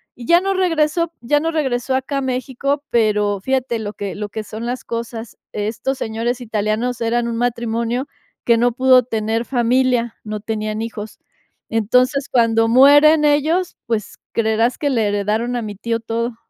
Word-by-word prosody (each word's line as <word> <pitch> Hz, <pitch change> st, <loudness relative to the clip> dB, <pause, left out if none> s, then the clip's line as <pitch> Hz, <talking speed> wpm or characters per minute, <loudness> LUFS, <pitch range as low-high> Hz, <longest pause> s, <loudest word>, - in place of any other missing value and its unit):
Y 240 Hz, -, -10 dB
ya 340 Hz, +5 st, +5 dB
no 390 Hz, +1 st, 0 dB
regresó, 335 Hz, -2 st, +1 dB
ya 290 Hz, +5 st, +2 dB
no 325 Hz, +2 st, -1 dB
regresó 265 Hz, -5 st, -1 dB
acá 265 Hz, +2 st, -2 dB
a -, -, 0 dB
México. 265 Hz, +2 st, -2 dB
Pero, 210 Hz, -3 st, +1 dB
fíjate 260 Hz, 0 st, -1 dB
lo 210 Hz, -1 st, -5 dB
que 200 Hz, -1 st, -5 dB
lo 210 Hz, 0 st, -5 dB
que 220 Hz, +1 st, -5 dB
son 220 Hz, +2 st, -7 dB
las 250 Hz, +1 st, -3 dB
cosas. 230 Hz, -1 st, -6 dB
Estos 220 Hz, +6 st, -2 dB
señores 235 Hz, +3 st, -2 dB
italianos 220 Hz, +2 st, -1 dB
eran 235 Hz, +1 st, 0 dB
un 230 Hz, -1 st, -3 dB
matrimonio 235 Hz, +1 st, -1 dB, 0.4 s
que 235 Hz, -1 st, +4 dB
no 245 Hz, +1 st, +3 dB
pudo 255 Hz, +1 st, +5 dB
tener 225 Hz, 0 st, -2 dB
familia, 245 Hz, -1 st, +1 dB
no 215 Hz, 0 st, -5 dB
tenían 215 Hz, 0 st, -3 dB
hijos. 220 Hz, -1 st, -7 dB, 0.5 s
Entonces, 250 Hz, +5 st, +1 dB
cuando 225 Hz, -2 st, +3 dB
mueren 290 Hz, +5 st, +6 dB
ellos, 310 Hz, +5 st, +1 dB
pues, 225 Hz, -4 st, -3 dB
creerás 225 Hz, +2 st, +1 dB
que 290 Hz, -, -1 dB
le 230 Hz, -5 st, +1 dB
heredaron 210 Hz, +4 st, -1 dB
a -, -, -2 dB
mi 210 Hz, -2 st, -6 dB
tío 230 Hz, +3 st, -2 dB
todo. 230 Hz, +1 st, -3 dB
235 Hz, 165 wpm, -19 LUFS, 220-265 Hz, 0.5 s, mueren